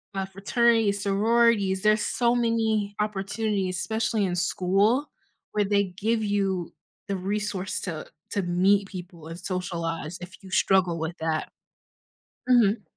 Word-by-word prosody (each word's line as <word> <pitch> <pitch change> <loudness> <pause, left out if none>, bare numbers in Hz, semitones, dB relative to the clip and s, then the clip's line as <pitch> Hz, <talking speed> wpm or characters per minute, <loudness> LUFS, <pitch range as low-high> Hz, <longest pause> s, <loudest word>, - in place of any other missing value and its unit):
uh, 195 0 -1
fraternities, 205 +1 +2
sororities, 205 -1 +2
there's 215 0 +4
so 240 -1 +1
many 220 -3 0
opportunities, 200 -2 -1
especially 220 +1 0
in 180 -1 -1
school, 195 - +2 0.5
where 210 -1 +2
they 200 0 +2
give 220 +1 0
you 195 -4 -1 0.3
the 200 - -1
resource 195 -1 -2
to 165 -5 -5 0.2
to 200 - 0
meet 195 +3 +3
people 175 -4 -9
and 165 +1 -7
socialize 170 -3 -3
if 180 +2 -9
you 190 - -11
struggle 185 -3 +3
with 160 +2 -3
that. 160 -1 -2 1.0
Mhm. 220 -4 +4
195 Hz, 130 wpm, -26 LUFS, 180-215 Hz, 1.0 s, there's